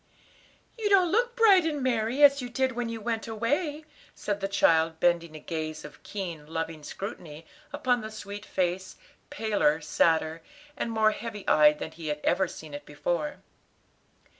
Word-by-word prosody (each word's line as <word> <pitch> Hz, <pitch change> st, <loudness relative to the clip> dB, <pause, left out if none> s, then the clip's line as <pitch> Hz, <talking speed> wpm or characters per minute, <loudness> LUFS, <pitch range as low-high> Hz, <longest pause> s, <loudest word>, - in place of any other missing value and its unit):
"You 425 Hz, -2 st, 0 dB
don't 370 Hz, -4 st, +5 dB
look 475 Hz, +3 st, +1 dB
bright 415 Hz, -6 st, +6 dB
and 300 Hz, -4 st, -2 dB
merry, 245 Hz, +2 st, +1 dB
as 280 Hz, -1 st, +7 dB
you 245 Hz, -, -5 dB
did 260 Hz, +1 st, 0 dB
when 240 Hz, -1 st, -3 dB
you 230 Hz, 0 st, -5 dB
went 225 Hz, +1 st, -3 dB
away," 290 Hz, +8 st, -1 dB, 0.3 s
said 205 Hz, -1 st, -3 dB
the 195 Hz, -, -1 dB
child, 165 Hz, -4 st, +3 dB
bending 170 Hz, -2 st, +1 dB
a -, -, -7 dB
gaze 155 Hz, -1 st, -5 dB
of 150 Hz, -, -12 dB
keen, 170 Hz, -7 st, -6 dB
loving 160 Hz, 0 st, -4 dB
scrutiny 165 Hz, -2 st, -8 dB, 0.3 s
upon 245 Hz, -1 st, +1 dB
the 215 Hz, -, -6 dB
sweet 205 Hz, -1 st, -8 dB
face, 185 Hz, -1 st, -2 dB, 0.3 s
paler, 205 Hz, -8 st, +1 dB
sadder, 160 Hz, 0 st, +1 dB, 0.3 s
and -, -, -3 dB
more 220 Hz, -1 st, +3 dB
heavy 215 Hz, -2 st, -7 dB
eyed 150 Hz, 0 st, +6 dB
than 160 Hz, -, -6 dB
he 165 Hz, -1 st, -8 dB
had 150 Hz, 0 st, -2 dB
ever 185 Hz, +1 st, +2 dB
seen 155 Hz, -3 st, -10 dB
it 145 Hz, 0 st, -6 dB
before. 150 Hz, +1 st, -3 dB
200 Hz, 165 wpm, -28 LUFS, 160-245 Hz, 0.3 s, as